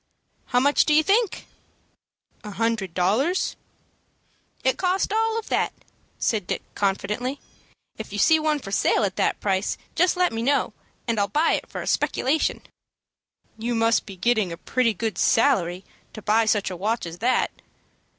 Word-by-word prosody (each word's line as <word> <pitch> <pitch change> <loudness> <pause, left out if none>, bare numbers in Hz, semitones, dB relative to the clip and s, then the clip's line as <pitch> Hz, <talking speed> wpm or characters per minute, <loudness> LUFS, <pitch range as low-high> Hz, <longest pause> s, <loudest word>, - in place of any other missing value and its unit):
"How 245 - +2
much 285 +3 +3
do 300 - +3
you 310 - +5
think?" 420 +3 +1 1.0
"A 210 - -7
hundred 210 -4 -2
dollars?" 230 - +1 1.1
"It 260 - +1
cost 375 +2 0
all 450 0 +1
of 450 - -5
that," - - +1 0.5
said 210 -6 -1
Dick, - - -3
confidently. 210 +7 -2 0.6
"If 220 - -7
you 205 - -5
see 320 +9 +5
one 310 -1 +1
for 195 -9 -8
sale 200 - +2
at 195 -2 -1
that - - +1
price, 195 0 -1 0.2
just 360 +1 +2
let 360 -6 +2
me 225 - -2
know, 275 +4 +1 0.3
and 230 -2 0
I'll 200 - +2
buy 300 - +2
it - - -3
for - - -5
a - - -8
speculation." 290 +5 0 1.0
"You 235 +2 -2
must 225 0 +2
be 195 - -8
getting 215 -1 +1
a 170 - -6
pretty 230 +3 0
good 215 -1 -3
salary 190 -8 +2 0.3
to 215 - -9
buy 220 +2 +3
such 210 -3 +1
a - - -5
watch 215 +5 -1
as 170 +1 -8
that." 250 +3 +1
230 Hz, 170 wpm, -24 LUFS, 200-290 Hz, 1.1 s, you